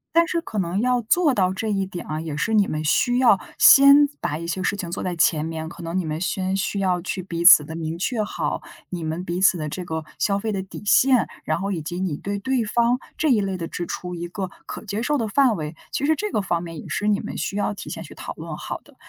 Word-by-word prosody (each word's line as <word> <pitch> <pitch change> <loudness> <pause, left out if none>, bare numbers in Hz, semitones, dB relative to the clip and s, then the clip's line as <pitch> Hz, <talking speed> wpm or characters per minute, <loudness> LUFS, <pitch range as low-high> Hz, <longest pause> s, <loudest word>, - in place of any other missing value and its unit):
但 335 0 +5
是 335 0 -1
可 215 -9 -4
能 180 +1 -1
要 250 +1 +2
做 295 +6 +3
到 185 -5 +2
这 220 +3 -3
一 195 -2 0
点 180 -2 -7
啊， 155 +1 -4
也 155 -2 -5
是 195 +9 -1
你 210 -2 +4
们 155 0 -3
需 245 +10 +2
要 240 -7 +5 0.2
先 280 +1 +8
把 155 -3 -2
一 170 - -6
些 175 +3 -3
事 200 - 0
情 175 -3 -5
做 180 - -4
在 180 -1 -2
前 155 -1 +2
面， 160 0 -4
可 170 - -10
能 170 +2 -3
你 185 - -1
们 155 +1 -3
先 190 +1 -1
需 195 +1 -1
要 180 -2 +1
去 185 +1 -4
彼 170 -2 -4
此 170 -4 +9
地 160 - -7
明 165 0 -4
确 215 +4 -1
好 - - -3 0.3
你 175 -2 -4
们 160 +3 -3
彼 175 +1 -3
此 190 -1 +5
的 155 -2 -3
这 180 +5 -5
个 160 -2 -4
消 200 -1 +1
费 220 +2 -2
的 195 -2 -2
底 190 +2 -10
线， 255 +3 +4 0.2
然 - - 0
后 200 0 -2
以 170 -5 -2
及 175 +4 -5
你 185 -6 -1
对 200 +6 -4
对 255 +4 0
方 235 +3 +1 0.2
这 310 - +1
一 225 -5 +4
类 195 -1 -2
的 165 -2 -4
支 175 0 -5
出 180 0 -5
一 175 0 -5
个 190 +1 -5 0.2
可 - - -7
接 205 +1 -3
受 295 +4 +1
的 225 - -1
范 250 0 +3
围， 155 -1 -5 0.2
其 285 - -1
实 315 - +3
这 420 +7 -3
个 205 - 0
方 175 -3 -1
面 165 -3 -7
也 - - -9
是 210 - -2
你 205 -1 +3
们 - - -6
需 200 - -3
要 205 - 0
提 - - -8
前 - - -6
去 - - -12
讨 - - -7
论 - - -7
好 - - -6
的。 - - -21
190 Hz, 295 characters per minute, -23 LUFS, 170-220 Hz, 0.3 s, 此